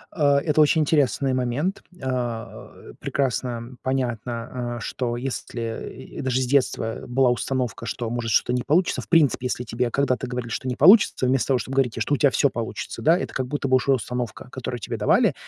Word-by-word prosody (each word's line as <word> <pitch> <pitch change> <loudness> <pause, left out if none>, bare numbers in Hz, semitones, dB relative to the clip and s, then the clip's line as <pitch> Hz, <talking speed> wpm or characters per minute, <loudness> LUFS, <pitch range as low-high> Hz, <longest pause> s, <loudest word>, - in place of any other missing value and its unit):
Э, 155 - -1
это 150 +1 +2
очень 155 +1 +4
интересный 140 -3 +2
момент. 130 - -1 0.2
А, 120 -4 -5
прекрасно 125 -2 -2
понятно, 120 -1 -3
а, - - -6
что 120 +1 -3
если, 120 -3 -5 0.2
и - - -3
даже 130 0 0
с - - +1
детства 125 -4 0
была 125 0 +3
установка, 125 -2 -2
что, 115 0 -3
может, 120 -1 -2
что-то 120 - +2
не 125 - 0
получится. 165 +6 +1
В - - -13
принципе, 145 -6 +3
если 125 - -3
тебе, 120 +1 -1
когда 135 0 +1
ты 125 +2 -6
говорили, 125 -1 -4
что 130 - -3
не 125 - -1
получится, 180 - +6
вместо 130 -1 +1
того, 135 -2 +3
чтобы 130 +2 -5
говорить 125 -4 +1
те, 115 - -4
что 145 - 0
у - - +3
тя 140 - +4
всё 140 +2 +2
получится, 115 -1 -5
да, 165 +3 +5
это - - -5
как 130 -1 -2
будто 145 0 -2
бы 130 0 +5
уже 135 +2 0
установка, 125 -1 -2
которую 125 -1 -5
тебе - - -4
давали. - - +3
125 Hz, 200 wpm, -24 LUFS, 120-135 Hz, 0.2 s, получится